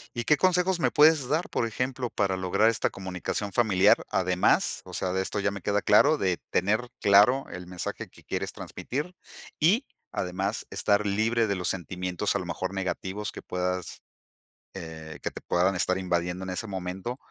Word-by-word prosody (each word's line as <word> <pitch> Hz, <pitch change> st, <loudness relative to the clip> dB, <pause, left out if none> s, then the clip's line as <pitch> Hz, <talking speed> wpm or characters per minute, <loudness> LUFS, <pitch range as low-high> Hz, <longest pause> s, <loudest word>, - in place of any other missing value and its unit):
¿Y 120 Hz, -, -2 dB
qué 150 Hz, -, +4 dB
consejos 180 Hz, +1 st, +2 dB
me -, -, +2 dB
puedes 150 Hz, -2 st, +5 dB
dar, 155 Hz, +5 st, 0 dB
por 115 Hz, -, -1 dB
ejemplo, 125 Hz, +2 st, -3 dB
para 95 Hz, -2 st, 0 dB
lograr 95 Hz, +4 st, +2 dB
esta 115 Hz, -, +1 dB
comunicación 95 Hz, +2 st, -4 dB
familiar? 105 Hz, 0 st, +4 dB
Además, 90 Hz, -1 st, +2 dB
o -, -, -11 dB
sea, 90 Hz, -, -2 dB
de 95 Hz, -, +1 dB
esto 100 Hz, +2 st, -2 dB
ya 100 Hz, -, +1 dB
me 100 Hz, -2 st, -7 dB
queda 105 Hz, +2 st, +1 dB
claro, 105 Hz, +10 st, +5 dB
de 95 Hz, -2 st, +1 dB
tener 110 Hz, +6 st, +1 dB
claro 105 Hz, +7 st, +5 dB
el 90 Hz, 0 st, -7 dB
mensaje 90 Hz, -1 st, -5 dB
que -, -, -18 dB
quieres -, -, -3 dB
transmitir. 150 Hz, +8 st, -5 dB, 0.4 s
Y 200 Hz, -, +3 dB, 0.3 s
además, 95 Hz, +4 st, -2 dB
estar 105 Hz, 0 st, +1 dB
libre 110 Hz, +3 st, +1 dB
de 100 Hz, -, 0 dB
los 90 Hz, -1 st, -1 dB
sentimientos, 90 Hz, +2 st, -2 dB
a -, -, +2 dB
lo -, -, -5 dB
mejor 90 Hz, +3 st, -4 dB
negativos, 95 Hz, +2 st, -3 dB
que -, -, -8 dB
puedas, 90 Hz, -1 st, -3 dB, 0.7 s
eh, 80 Hz, -3 st, -8 dB
que -, -, -2 dB
te -, -, -9 dB
puedan 90 Hz, +2 st, +1 dB
estar 90 Hz, +1 st, +1 dB
invadiendo 90 Hz, 0 st, -1 dB
en 95 Hz, -, -4 dB
ese 100 Hz, +5 st, -3 dB
momento, 95 Hz, +5 st, -4 dB
100 Hz, 180 wpm, -27 LUFS, 90-115 Hz, 0.7 s, puedes